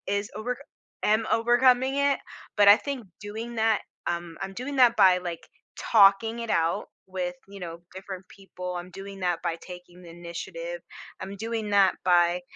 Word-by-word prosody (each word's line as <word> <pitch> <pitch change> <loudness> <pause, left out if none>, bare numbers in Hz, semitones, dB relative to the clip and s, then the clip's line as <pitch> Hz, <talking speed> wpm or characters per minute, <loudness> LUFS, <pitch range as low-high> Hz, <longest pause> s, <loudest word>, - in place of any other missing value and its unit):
is 200 +1 -2
overc 245 +3 -3 0.5
am 220 +1 +3
overcoming 250 +3 +4
it, 280 -1 +2 0.4
but 205 -1 +6
I 205 - +11
think 270 -7 -5
doing 225 +3 -6
that 220 -1 +2 0.3
um, 170 -1 -3
I'm 195 0 -4
doing 255 +6 -5
that 245 -2 +6
by 185 -3 +6
like 175 -2 -6 0.3
talking 220 +2 +4
it 230 -1 -5
out 165 0 0 0.2
with, 180 -1 -2
you 200 0 -11
know, 170 -1 -7
different 190 -1 -8
people; 180 -2 -7
I'm 180 +1 -8
doing 195 +1 -9
that 175 -2 0
by 170 -2 -1
taking 180 0 -12
the 170 - -12
initiative; 175 - -7 0.4
I'm 195 +1 -6
doing 225 -1 -3
that 200 -1 +5
by 175 0 +3
195 Hz, 165 wpm, -27 LUFS, 180-230 Hz, 0.5 s, I